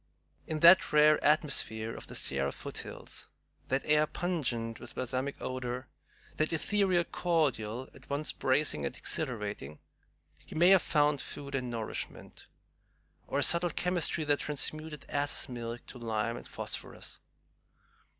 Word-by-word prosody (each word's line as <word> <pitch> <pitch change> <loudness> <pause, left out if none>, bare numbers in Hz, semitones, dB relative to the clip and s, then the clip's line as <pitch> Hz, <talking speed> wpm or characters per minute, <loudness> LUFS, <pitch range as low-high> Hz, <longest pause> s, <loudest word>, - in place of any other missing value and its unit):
In 155 -1 -2
that 170 +2 +8
rare 150 0 +6
atmosphere 140 -7 +2
of - - -8
the - - -7
Sierra 70 0 0
foothills, - - -7 0.4
that 135 +1 0
air 150 0 +4
pungent 125 -12 -2
with 120 - -11
balsamic 130 +2 -2
odor, 130 0 -4 0.5
that 155 +1 +1
ethereal 185 +2 +2
cordial 130 -10 0
at - - -17
once 145 +2 -1
bracing 130 - +1
and 70 - -3
exhilarating, 105 - -3 0.7
he - - -11
may 175 +3 +6
have 190 -2 +7
found 150 -2 +2
food 140 -1 -7
and 130 -2 -1
nourishment, 115 -2 -5 0.8
or - - -1
a - - +3
subtle 170 +1 +4
chemistry 175 -1 +1
that 145 -1 +2
transmuted 155 +1 -3
ass's 145 0 0
milk 120 -2 -6
to 125 - -10
lime 115 0 -1
and - - -9
phosphorus. - - -5
140 Hz, 135 wpm, -31 LUFS, 120-155 Hz, 0.8 s, that